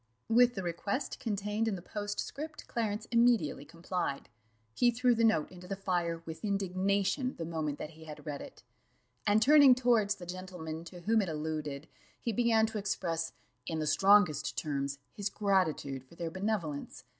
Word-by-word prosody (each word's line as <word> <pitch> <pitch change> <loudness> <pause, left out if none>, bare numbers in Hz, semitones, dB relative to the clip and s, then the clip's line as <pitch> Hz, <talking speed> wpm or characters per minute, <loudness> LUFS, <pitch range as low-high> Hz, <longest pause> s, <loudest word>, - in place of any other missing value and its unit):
With 245 +2 +5
the 190 - -3
request 200 - -3
contained 210 -1 -1
in 215 - 0
the 180 - -7
postscript 215 +11 -5
Clarence 215 -2 -2
immediately 230 - +3
complied; 170 -2 -3 0.4
he 245 - +4
threw 245 +1 +3
the 230 0 +1
note 165 -9 +3
into 180 0 -11
the 195 - -3
fire 175 -3 -1
with 160 +4 -8
indignation 200 +5 0
the 165 - -4
moment 155 -3 -2
that 155 - -6
he 160 0 -14
had 155 0 -10
read 145 -2 -4
it, - - -11 0.6
and 210 +2 +5
turning 285 -2 +8
towards 235 -5 +3
the 180 - -10
gentleman 175 -3 -6
to 175 +1 -10
whom 220 +4 +3
it 190 - -2
alluded, 155 -1 -4 0.3
he 230 - -2
began 225 0 +4
to 220 -1 -3
express, 170 -5 -2 0.3
in 160 - -2
the 155 - -1
strongest 195 -2 +4
terms, 140 -2 -2
his 205 -1 -3
gratitude 180 -10 0
for 135 +6 -18
their 165 -1 -4
benevolence. 175 -10 -3
190 Hz, 165 wpm, -32 LUFS, 160-220 Hz, 0.6 s, turning